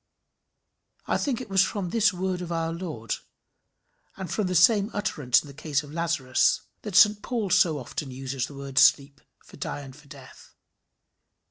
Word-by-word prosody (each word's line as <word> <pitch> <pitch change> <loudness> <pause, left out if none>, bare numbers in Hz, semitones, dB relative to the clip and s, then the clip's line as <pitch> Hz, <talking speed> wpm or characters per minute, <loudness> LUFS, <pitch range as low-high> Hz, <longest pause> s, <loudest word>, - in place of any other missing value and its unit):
I - - 0
think 265 -5 -1
it 250 - -9
was 190 -1 +4
from 190 -5 -3
this 225 -2 +3
word 185 0 -3
of 175 -1 -6
our 165 -1 -2
Lord, 160 -10 -5 1.0
and 190 -2 -6
from 210 -4 -1
the 185 - -2
same 200 +4 +5
utterance 145 - +1
in - - -13
the 140 - -11
case 150 0 -2
of 145 0 -12
Lazarus, 165 -6 +1 0.2
that 210 -4 -6
St 205 +1 +6
Paul 225 -6 -3
so 175 -5 +4
often 135 +2 -6
uses 130 0 -4
the 145 - -12
word 140 -1 -1
sleep 140 0 +4 0.2
for - - -15
die - - -5
and 135 -2 -11
for 150 -1 -18
death. 140 -3 -15
165 Hz, 175 wpm, -26 LUFS, 140-195 Hz, 1.0 s, St